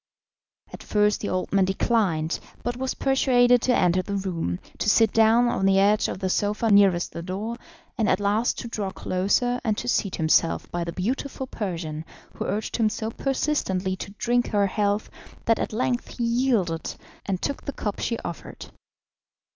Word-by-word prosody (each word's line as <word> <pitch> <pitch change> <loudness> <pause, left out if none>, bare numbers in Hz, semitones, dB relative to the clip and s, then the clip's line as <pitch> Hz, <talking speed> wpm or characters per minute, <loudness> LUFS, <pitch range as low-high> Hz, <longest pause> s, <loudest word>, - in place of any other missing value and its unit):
At - - -8
first 210 -1 +1
the - - -2
old 185 +1 -2
man 195 -1 +4
declined, 185 -5 0 0.2
but 240 0 -2
was 260 +1 -3
persuaded 245 -3 +4
to 250 -1 +2
enter 180 +1 +3
the 200 +2 -4
room, 175 - -2 0.2
to - - +1
sit 220 +1 +4
down 225 +2 +5
on 195 -5 +1
the 195 0 +4
edge 205 +2 +4
of - - -4
the 190 0 -2
sofa 210 +4 0
nearest 195 -4 +4
the 170 - -6
door, 200 +7 -4 0.4
and 215 -3 +2
at 185 - +2
last 205 +4 +1
to 235 - -5
draw 210 -4 -3
closer 200 +8 0
and 215 -3 0
to 245 - -4
seat 200 -5 0
himself 160 0 +2
by 175 0 -2
the 170 - -4
beautiful 260 - -3
Persian, 170 -10 -4 0.3
who - - -4
urged 210 +1 -2
him 225 -2 +3
so 220 +1 -4
persistently 210 -10 -1
to 195 - -6
drink 245 0 +1
her 205 -1 +2
health 205 +1 0 0.4
that 225 -1 +3
at - - -2
length 245 +2 -2
he 240 - -1
yielded, 230 -9 0 0.3
and 190 -3 -1
took 280 - -4
the - - -2
cup 205 -2 -4
she 230 - -1
offered. 170 - -8
210 Hz, 180 wpm, -25 LUFS, 185-235 Hz, 0.4 s, down